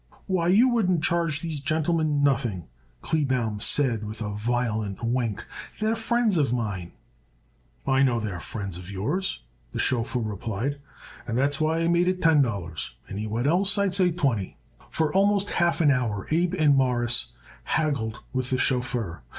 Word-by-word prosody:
"Why, 180 -3 0
you 210 +8 +5
wouldn't 185 -10 +1
charge 165 -3 +1
these 160 -3 -3
gentlemen 155 0 +1
nothing," 120 - +1 0.4
Kleebaum 130 -8 0
said 120 -2 +1
with 105 +1 -6
a 105 -2 -3
violent 110 -2 -2
wink. 115 -3 -1 0.3
"They're 220 +1 +1
friends 225 -3 +1
of 140 -6 +2
mine." 105 -8 -3 0.9
"I 135 0 +3
know 125 -4 +3
they 105 -3 -3
was 85 - -6
friends 100 -5 -4
of 90 +1 -9
yours," 140 - -2 0.3
the - - -4
chauffeur 125 0 0
replied, 110 +6 -3 0.5
"and 115 0 -1
that's 140 +3 +1
why 160 +1 +1
I 165 - +1
made 175 +1 +3
it 185 0 +1
ten 160 -4 +5
dollars. 100 - -3 0.2
Anyone 110 +4 -2
else 190 +7 +3
I'd 200 -2 +1
say 185 -2 +4
twenty." 135 - -1 0.3
For 155 -2 0
almost 200 +1 +2
half 170 -1 +1
an 150 -3 +5
hour 115 -7 -1
Abe 170 +3 +2
and 150 -5 +4
Morris 120 -3 +2 0.3
haggled 140 -9 -1
with 130 0 -1
the 130 - +1
chauffeur. 120 - -1
135 Hz, 160 wpm, -26 LUFS, 110-170 Hz, 0.9 s, you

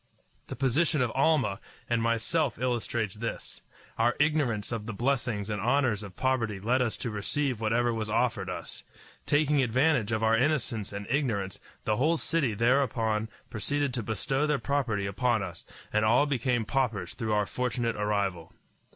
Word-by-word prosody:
The - - -6
position 145 +5 +2
of 120 - -1
Almah 135 -9 +2 0.3
and 120 -1 +1
myself 115 +8 0
illustrates 120 -4 -1
this. 115 +1 -6 0.4
Our 120 +2 +3
ignorance 145 -9 +1
of 115 -2 -4
the 115 - -4
blessings 120 -4 0
and 105 -2 -2
honors 120 -3 +2
of 100 -3 -9
poverty 115 -6 0
led 120 +6 +1
us 120 -3 0
to 115 - -4
receive 120 +4 -1
whatever 115 +2 +2
was 110 -1 -3
offered 105 -4 0
us. 90 - -5 0.4
Taking 145 -1 +3
advantage 125 -1 +2
of 110 0 0
our 110 0 +4
innocence 120 -5 0
and 100 0 -5
ignorance, 115 -9 -1 0.3
the 105 - +1
whole 155 +6 +3
city 140 -9 0
thereupon 115 -2 +1 0.2
proceeded 140 +4 -1
to 120 - -1
bestow 135 +7 0
their 150 -1 +2
property 130 -9 -1
upon 110 +3 +1
us, 85 -3 -8 0.3
and 105 0 +3
all 120 +6 +4
became 125 -4 0
paupers 110 -9 -1
through 110 -3 -2
our 105 -1 +2
fortunate 120 0 -1
arrival. 100 -5 -1
115 Hz, 160 wpm, -29 LUFS, 105-135 Hz, 0.4 s, our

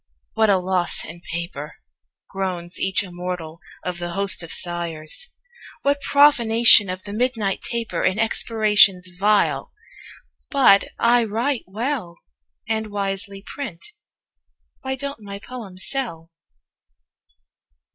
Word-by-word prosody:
"What 220 -1 +3
a 195 - +5
loss 180 -1 -1
in 170 - -10
paper," 165 -3 -5 0.5
Groans 180 -2 -4
each 190 +1 +1
immortal 175 -3 -6 0.3
of 180 -1 -3
the 175 0 -4
host 195 -1 +2
of 165 - -6
sighers! 170 - -1 0.5
"What 280 0 +1
profanation 235 -8 +6
of 185 0 -5
the 205 - -7
midnight 225 -4 -1
taper 235 -2 -2
In 185 - +1
expirations 215 -4 +3
vile! 205 +3 +2 0.8
But 260 -8 +5
I 240 +1 +4
write 235 +5 -1
well, 215 -3 -3 0.5
And 220 -1 -1
wisely 195 -1 -4
print. 235 -12 -7 1.0
Why 265 -1 -3
don't 280 -3 -5
my 200 -1 -7
poems 200 -4 -7
sell?" 170 -12 -4
200 Hz, 115 wpm, -22 LUFS, 180-230 Hz, 1.0 s, profanation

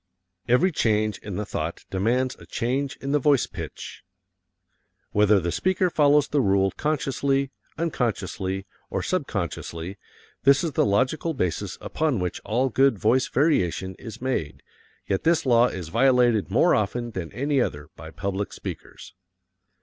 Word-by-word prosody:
Every 140 +11 +4
Change 110 - +1
in 100 -3 -7
the 105 - -2
Thought 80 -3 -4
Demands 120 +7 +1
a - - -14
Change 135 +4 -2
in 135 - -3
the 150 - +3
Voice 140 -1 +3
Pitch - - -8 1.1
Whether 105 0 +4
the 85 -1 -2
speaker 185 - +1
follows 145 -1 +4
the 145 - +1
rule 95 -3 +2
consciously, 140 -2 0 0.3
unconsciously, 110 - -2 0.2
or - - -2
subconsciously, 85 +4 -3 0.4
this 140 +3 +5
is 165 - -1
the 130 - +2
logical 135 +10 +1
basis 90 -9 -2
upon 155 -5 -1
which 90 -2 -3
all 125 +5 +1
good 135 -1 +3
voice 120 +6 +2
variation 95 - +1
is 115 -2 -9
made, 105 - -2 0.4
yet 95 - -1
this 165 -2 +2
law 120 -1 +5
is 90 -7 -6
violated 120 -1 +3
more 130 - +4
often 115 +3 -1
than 95 -6 -5
any 140 +1 0
other 75 -9 -3
by 80 - -10
public 100 +4 -3
speakers. 90 - -8
120 Hz, 145 wpm, -25 LUFS, 95-140 Hz, 1.1 s, this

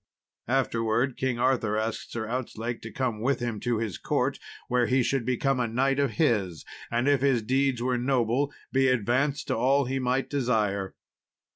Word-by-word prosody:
Afterwards, 120 -1 +1
King 130 -2 -1
Arthur 120 -4 +1
asked 110 0 -3
Sir 110 -2 -3
Outzlake 120 -1 -4
to - - -8
come 120 -5 -2
with 130 +2 +1
him 120 -3 -3
to 120 0 0
his 110 -4 -3
court, - - 0 0.3
where 125 -1 +2
he 130 0 +3
should 130 -1 -1
become 130 +1 +1
a 120 - +1
knight 135 +4 +1
of 140 -1 +1
his, 105 - 0 0.2
and, 120 +3 0
if 145 -3 +3
his 135 -5 +2
deeds 130 +1 +1
were 125 -1 +1
noble, 130 +2 +1 0.2
be 135 0 +3
advanced 130 +4 +1
to - - +1
all 135 +4 +3
he 135 +2 -2
might 130 +1 0
desire. 105 -8 0
125 Hz, 175 wpm, -27 LUFS, 115-135 Hz, 0.3 s, he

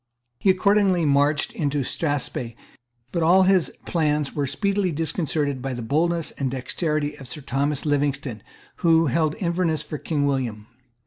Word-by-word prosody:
He 195 - +2
accordingly 190 -2 +3
marched 145 +1 +2
into 145 -2 -1
Strathspey. 135 -5 -2 0.6
But 170 - -1
all 180 +4 +5
his 185 -2 +3 0.2
plans 150 -4 0
were 145 -2 -1
speedily 200 +3 0
disconcerted 150 -3 -1
by 135 0 -3
the 120 - -5
boldness 165 +6 0
and 135 -2 -2
dexterity 145 +3 -2
of 135 - -10
Sir 150 +4 -7
Thomas 140 +2 -1
Livingstone, 140 -6 -1 0.4
who 165 -1 +4
held 155 +2 +1
Inverness 170 -4 0
for 150 -1 -6
King 145 -3 -1
William. 125 -7 -1
150 Hz, 145 wpm, -24 LUFS, 140-170 Hz, 0.6 s, all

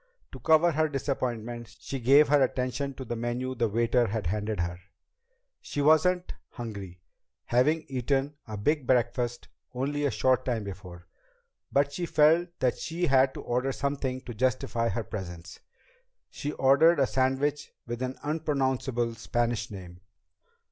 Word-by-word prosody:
To - - -9
cover 160 +2 +4
her 155 0 +1
disappointment, 120 -4 -3
she 135 - -5
gave 140 +5 +6
her 145 -1 +5
attention 130 +1 -1
to 130 - -7
the 120 - -3
menu 120 +2 -2
the 115 -2 0
waiter 115 +2 +2
had 105 -1 -3
handed 105 +1 -1
her. 85 +1 -3 0.8
She - - -5
wasn't 175 +5 +3 0.2
hungry, 100 -7 -7 0.4
having 150 +7 +2
eaten 135 +2 -1
a 110 -1 -5
big 140 +5 0
breakfast 120 -1 0 0.3
only 145 +3 -1
a 145 - +3
short 130 +3 +2
time 120 -4 -1
before, 90 -3 -9 0.7
but 140 0 +2
she 175 +3 -3
felt 160 +3 +4
that 125 -2 +1
she 170 +2 -2
had 135 -3 +3
to - - -6
order 125 +3 -1
something 135 -2 -2
to 120 - -8
justify 125 0 0
her 115 - -2
presence. 90 -5 -7 0.7
She 145 - -4
ordered 140 +5 +5
a 135 - +5
sandwich 135 +3 0
with 120 +1 -5
an 130 0 -3
unpronounceable 135 -6 -1
Spanish 120 0 -1
name. 90 -3 -10
130 Hz, 150 wpm, -28 LUFS, 115-145 Hz, 0.8 s, gave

